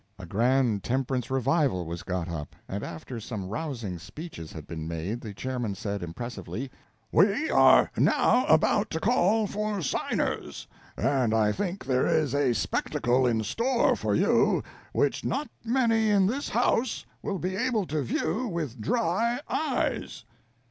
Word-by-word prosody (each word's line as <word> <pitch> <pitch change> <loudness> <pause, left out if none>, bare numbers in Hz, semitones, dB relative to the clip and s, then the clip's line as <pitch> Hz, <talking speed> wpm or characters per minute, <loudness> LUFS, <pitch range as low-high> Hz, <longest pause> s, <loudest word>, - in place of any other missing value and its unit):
A 95 - -8
grand 115 +2 +2
temperance 130 -1 -1
revival 135 - +1
was 85 +1 -5
got 90 -2 -3
up, 75 -4 -6
and 100 +1 -4
after 115 +9 -6
some 105 -3 -5
rousing 115 - -4
speeches 150 - -9
had 80 -3 -8
been 80 -2 -6
made 85 +8 -3
the 110 - -6
chairman 120 -1 -3
said, 100 -1 -4
impressively: 120 +8 -6 0.4
"We 205 - +3
are - - +6
not 250 +1 +3
about 210 0 +4
to 160 - -2
call 215 +1 +3
for 210 -2 -2
signers; - - -2 0.3
and 125 -5 +2
I 105 -1 +3
think 190 - -3
there 130 -1 +2
is 155 -5 +2
a 140 -4 +2
spectacle 120 +3 +1
in 115 -2 +1
store 235 - +2
for - - -1
you - - +3 0.3
which - - +1
not 290 +1 -2
many 230 -2 +2
in 200 -2 +4
this 260 +9 -1
house 235 0 +1 0.2
will 195 - -2
be 185 +2 -3
able 225 -2 0
to 155 -2 -2
view 220 - -1
with 155 - -4
dry 230 - +1
eyes." 315 - -2
135 Hz, 150 wpm, -27 LUFS, -, 0.4 s, are